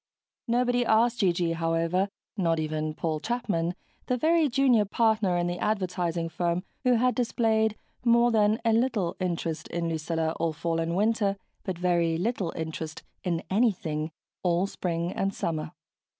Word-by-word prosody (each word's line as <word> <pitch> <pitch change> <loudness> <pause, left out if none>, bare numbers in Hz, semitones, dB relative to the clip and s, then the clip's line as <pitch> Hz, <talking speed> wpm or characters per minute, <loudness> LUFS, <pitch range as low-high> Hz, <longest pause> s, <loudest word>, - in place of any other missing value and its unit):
Nobody 245 +1 +2
asked 235 +1 +3
G.G. 175 -4 +2
however 165 +3 0 0.3
not 165 -5 +1
even 155 0 -2
Paul 155 -2 -1
Chapman, 180 -5 -1 0.3
the 250 - +1
very 320 +2 +3
junior 245 -3 +4
partner 215 -3 +2
in 175 - +1
the 175 0 -2
advertising 180 -5 -1
firm, 170 +1 -1 0.2
who 250 -1 +4
had 250 +2 +3
displayed 220 -3 +1 0.3
more 235 0 +5
than 215 0 +3
a 225 - +4
little 225 -7 +1
interest 170 -3 -2
in 170 0 -2
Lucilla 160 0 -1
all 165 -1 0
fall 165 +1 -1
and 165 +1 -1
winter, 205 -1 +1 0.3
but 185 -3 -3
very 170 -2 +2
little 190 -2 -1
interest 160 -1 -5 0.2
in 170 -2 -1
anything 175 -8 +1 0.3
all 175 +1 +2
spring 175 -3 -2
and 195 0 -1
summer. 160 -2 -2
180 Hz, 150 wpm, -27 LUFS, 165-225 Hz, 0.3 s, more